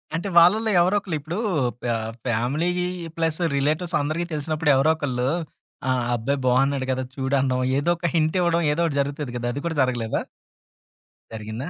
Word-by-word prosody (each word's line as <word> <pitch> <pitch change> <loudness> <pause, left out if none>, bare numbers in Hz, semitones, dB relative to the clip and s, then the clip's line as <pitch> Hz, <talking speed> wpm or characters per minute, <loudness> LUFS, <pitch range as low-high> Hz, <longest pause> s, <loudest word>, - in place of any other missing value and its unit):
అంటే 175 +4 -3
వాళ్ళలో 215 +6 +6
ఎవరో 185 +4 +3
ఒకళ్ళు 185 -5 -4
ఇప్పుడు 160 +6 -5 0.5
పా 120 - 0 0.3
ఫ్యామిలీ 125 +9 0 0.5
ప్లస్ 160 0 0 0.2
రిలేటివ్స్ 155 +5 0
అందరికి 155 +4 -2
తెలిసినప్పుడు 155 +1 -1
ఎవరో 135 +4 +3
ఒకళ్ళు 130 -5 -2 0.6
ఆహ్, 130 -1 +1
"అబ్బాయి 135 +5 -1
బాగున్నాడు 135 +1 +2
గదా! 130 0 -1
చూడు" 135 0 -1
అనడం 130 -1 +1 0.2
ఏదో 145 +4 0
ఒక 170 0 -1
హింటివ్వడం 170 +1 +2
ఏదో 165 - 0
ఒకటి 145 -3 -1
జరుగుతది 140 -1 -4
గదా! 120 0 -3
అది 145 - -4
కూడా 170 -1 -2
జరగలేదా? 120 -4 0 1.1
జరిగిందా? 110 +7 -6
145 Hz, 155 wpm, -23 LUFS, 130-165 Hz, 1.1 s, వాళ్ళలో